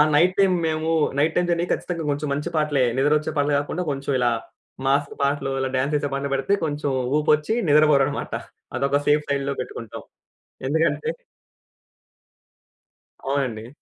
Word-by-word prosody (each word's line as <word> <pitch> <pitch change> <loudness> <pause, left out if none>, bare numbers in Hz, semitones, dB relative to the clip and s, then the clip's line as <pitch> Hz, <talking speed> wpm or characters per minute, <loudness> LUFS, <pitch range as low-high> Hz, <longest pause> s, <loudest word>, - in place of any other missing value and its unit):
Night 180 +5 +4
time 190 -2 +4
మేము, 155 0 -1 0.3
night 155 +3 +2
time 180 0 +2
journey 170 0 +1
ఖచ్చితంగా 170 -2 -2
కొంచెం 145 +1 -2
మంచి 145 +4 -2
పాటలే 150 -3 +2
నిద్రొచ్చే 150 +3 +2
పాటలు 145 0 +1
గాకుండా, 145 +5 -2
కొంచెం 140 0 -3
ఇలా 120 -1 +3 0.5
మాస్ 140 +1 +2
పాటలు, 140 -1 0
ఇలా 135 0 -1
డాన్స్ 135 +3 0
చేసే 145 -1 0
పాటలు 140 0 -2
బెడితే 135 +9 +1
కొంచెం 145 -1 -2 0.3
ఊపొచ్చి 150 +5 +2 0.2
నిద్రపోరన్నమాట. 145 -2 +3 0.4
అదొక 140 +1 +1
సేఫ్ 150 0 +4
సైడ్‌లో 140 0 0
పెట్టుకుంటాం. 115 -2 -8 0.6
ఎందుకంటే 160 - +1 2.2
అవునండి. 130 -5 -2
145 Hz, 135 wpm, -23 LUFS, 140-155 Hz, 2.2 s, Night